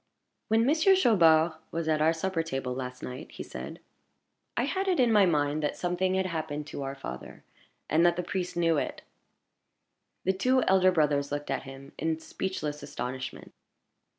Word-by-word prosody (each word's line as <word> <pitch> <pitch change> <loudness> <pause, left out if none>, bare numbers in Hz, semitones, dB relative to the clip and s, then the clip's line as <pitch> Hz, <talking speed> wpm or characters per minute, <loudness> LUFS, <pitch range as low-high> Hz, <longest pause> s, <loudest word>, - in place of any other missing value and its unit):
"When 225 +1 +3
Monsieur 320 +7 +5
Chaubard 170 - +5 0.2
was 165 -1 -3
at 155 -1 +2
our 160 +1 +5
supper 165 +1 -1
table 135 -5 -3
last 125 0 -6
night," 125 +1 -7
he - - -6
said, - - -8 0.8
"I - - +2
had 385 +1 -1
it 365 -5 +2
in 245 -2 +4
my 205 -3 +6
mind 150 -2 +1
that 150 - -2
something 185 +1 0
had 190 0 +1
happened 155 -4 -3
to - - -6
our 135 0 -4
father, 100 - -8 0.4
and 160 +3 +3
that 175 0 +4
the 180 - -2
priest 180 0 -3
knew 165 -2 +3
it." - - -3 1.2
The 190 - +2
two 255 +6 +2
elder 185 -1 +4
brothers 145 -4 +1
looked 145 0 -3
at - - -1
him 135 +1 -11
in 160 0 0
speechless 155 -3 -4
astonishment. 130 +2 -6
165 Hz, 175 wpm, -28 LUFS, 145-190 Hz, 1.2 s, my